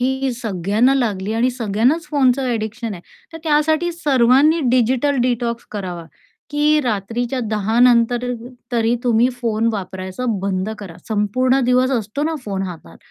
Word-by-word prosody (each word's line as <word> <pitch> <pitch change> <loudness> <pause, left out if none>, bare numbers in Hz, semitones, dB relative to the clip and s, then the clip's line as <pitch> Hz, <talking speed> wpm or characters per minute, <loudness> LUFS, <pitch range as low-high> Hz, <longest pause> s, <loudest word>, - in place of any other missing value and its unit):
ही 265 +1 0
सगळ्यांना 220 +3 +1
लागली 215 -5 -1
आणि 235 +3 +1
सगळ्यांनाच 245 - 0
फोनचं 270 -2 +2
ॲडिक्शन 225 -1 -3
आहे. 175 - -10 0.3
तर 325 - -7
त्यासाठी 315 +3 +2
सर्वांनी 285 +1 +3
डिजिटल 255 +3 +2
डिटॉक्स 240 -1 -1
करावा, 180 -5 -5 0.5
की 300 +1 +3
रात्रीच्या 235 +4 -2
10:00 215 +2 0
नंतर 245 0 +4
अ - - -1
अ - - -8 0.2
तरी 230 0 +2
तुम्ही 240 +1 +3
फोन 230 -1 0
वापरायचा 190 +3 -5 0.2
बंद 190 +1 -2
करा, 185 -5 -9
संपूर्ण 255 +5 +1
दिवस 255 +1 +3
असतो 230 +2 -2
ना 320 0 -1
फोन 195 -2 -3
हातात 165 - -8
235 Hz, 145 wpm, -19 LUFS, 210-260 Hz, 0.5 s, नंतर